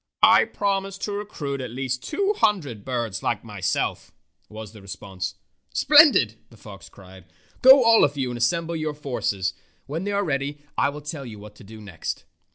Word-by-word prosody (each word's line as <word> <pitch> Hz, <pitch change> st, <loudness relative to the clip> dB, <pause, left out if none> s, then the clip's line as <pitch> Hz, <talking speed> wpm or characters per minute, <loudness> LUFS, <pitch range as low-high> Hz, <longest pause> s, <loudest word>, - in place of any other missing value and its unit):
"I -, -, +7 dB
promise 195 Hz, -1 st, -2 dB
to 205 Hz, -, -4 dB
recruit 160 Hz, -10 st, -4 dB
at 125 Hz, -, -5 dB
least 130 Hz, +1 st, -3 dB
two 400 Hz, +6 st, 0 dB
hundred 160 Hz, -, 0 dB
birds 120 Hz, -6 st, -3 dB
like -, -, -2 dB
myself," -, -, -3 dB, 0.4 s
was 110 Hz, -1 st, -9 dB
the 105 Hz, -2 st, -14 dB
response. 95 Hz, -1 st, -6 dB, 0.2 s
" -, -, -40 dB
Splendid! 280 Hz, -, +6 dB
" -, -, -41 dB
the 115 Hz, -, -18 dB
fox 100 Hz, -4 st, -12 dB
cried. 95 Hz, -2 st, -15 dB, 0.2 s
" -, -, -32 dB
Go, 265 Hz, +1 st, +9 dB
all 230 Hz, -1 st, +6 dB
of 145 Hz, 0 st, +1 dB
you, 130 Hz, -2 st, -1 dB
and 120 Hz, -, -5 dB
assemble 165 Hz, +7 st, 0 dB
your 155 Hz, -2 st, -3 dB
forces. 100 Hz, -10 st, -2 dB, 0.3 s
When 160 Hz, +6 st, -4 dB
they 205 Hz, -, -2 dB
are 200 Hz, 0 st, 0 dB
ready 140 Hz, -1 st, -2 dB, 0.2 s
I -, -, +2 dB
will 150 Hz, +1 st, -8 dB
tell 150 Hz, -1 st, -6 dB
you 110 Hz, -2 st, -9 dB
what 105 Hz, +1 st, -12 dB
to -, -, -14 dB
do 110 Hz, +2 st, -12 dB
next." 100 Hz, -6 st, -6 dB
135 Hz, 195 wpm, -24 LUFS, -, 0.4 s, Go